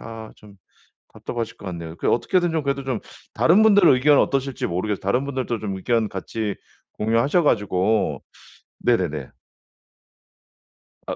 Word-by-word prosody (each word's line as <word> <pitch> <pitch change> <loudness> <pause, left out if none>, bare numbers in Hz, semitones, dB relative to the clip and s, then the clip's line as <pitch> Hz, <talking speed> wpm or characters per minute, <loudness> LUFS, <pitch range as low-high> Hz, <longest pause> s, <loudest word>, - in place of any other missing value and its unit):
아 115 -1 -9
좀 100 -2 -17 0.6
답답하실 115 -2 -5
것 - - -12
같네요. 85 -2 -7
그 - - 0
어떻게든 175 +7 +1
좀 160 -2 -1
그래도 140 -1 -2
좀 130 -5 -2 0.3
다른 180 +6 +4
분들 205 -3 +5
의견은 140 0 +5
어떠실지 135 -1 -1
모르겠어요. 95 +4 -2
다른 125 +8 0
분들도 130 -5 -3
좀 100 -3 -4
의견 110 +3 0
같이 105 +2 -4 0.4
공유하셔 115 +10 +1
가지고 105 -3 +1 0.6
네네네. 85 - 0 1.8
아 - - -3
115 Hz, 305 characters per minute, -22 LUFS, 100-140 Hz, 1.8 s, 분들